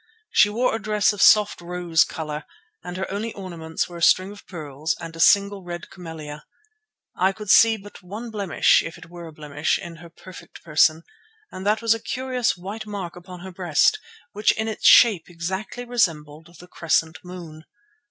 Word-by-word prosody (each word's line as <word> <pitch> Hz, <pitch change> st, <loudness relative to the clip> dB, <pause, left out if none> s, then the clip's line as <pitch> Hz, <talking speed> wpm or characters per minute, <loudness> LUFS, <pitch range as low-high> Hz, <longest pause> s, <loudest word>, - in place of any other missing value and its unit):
She 210 Hz, -, +5 dB
wore 240 Hz, +4 st, 0 dB
a 225 Hz, -, -5 dB
dress 210 Hz, +1 st, +2 dB
of 205 Hz, -, -5 dB
soft 210 Hz, -1 st, +5 dB
rose 175 Hz, -2 st, +1 dB
colour, 155 Hz, -1 st, -6 dB, 0.4 s
and 180 Hz, +1 st, -7 dB
her 190 Hz, -, -4 dB
only 215 Hz, +3 st, -4 dB
ornaments 170 Hz, -4 st, -5 dB
were 175 Hz, -, -10 dB
a -, -, -9 dB
string 185 Hz, +3 st, +4 dB
of 205 Hz, -, -14 dB
pearls 155 Hz, -3 st, -4 dB
and 165 Hz, -1 st, -8 dB
a -, -, -10 dB
single 200 Hz, +2 st, +4 dB
red 175 Hz, 0 st, -8 dB
camellia. 155 Hz, -4 st, -9 dB, 0.7 s
I 190 Hz, +2 st, +2 dB
could 210 Hz, 0 st, -3 dB
see 225 Hz, 0 st, +6 dB
but 205 Hz, 0 st, -13 dB
one 210 Hz, +6 st, -8 dB
blemish, 200 Hz, -5 st, +3 dB
if 165 Hz, -, -7 dB
it 170 Hz, -, -15 dB
were 175 Hz, -1 st, -9 dB
a -, -, -10 dB
blemish, 150 Hz, 0 st, -2 dB
in 170 Hz, -1 st, -9 dB
her 170 Hz, 0 st, -13 dB
perfect 185 Hz, +2 st, -14 dB
person, 155 Hz, 0 st, +3 dB, 0.5 s
and 190 Hz, +2 st, -6 dB
that 215 Hz, +2 st, +1 dB
was 225 Hz, -1 st, +4 dB
a 225 Hz, -, -4 dB
curious 255 Hz, -3 st, -2 dB
white 205 Hz, +5 st, -7 dB
mark 195 Hz, -5 st, -6 dB
upon 180 Hz, 0 st, -11 dB
her 190 Hz, +1 st, -8 dB
breast, 180 Hz, -, +2 dB, 0.3 s
which 210 Hz, +1 st, +2 dB
in 220 Hz, +1 st, -3 dB
its 220 Hz, -, 0 dB
shape 210 Hz, -9 st, +6 dB
exactly 190 Hz, +8 st, -5 dB
resembled 165 Hz, -8 st, -2 dB
the 180 Hz, -, -13 dB
crescent 160 Hz, -1 st, -1 dB
moon. 170 Hz, -4 st, -10 dB
180 Hz, 185 wpm, -23 LUFS, 165-210 Hz, 0.7 s, see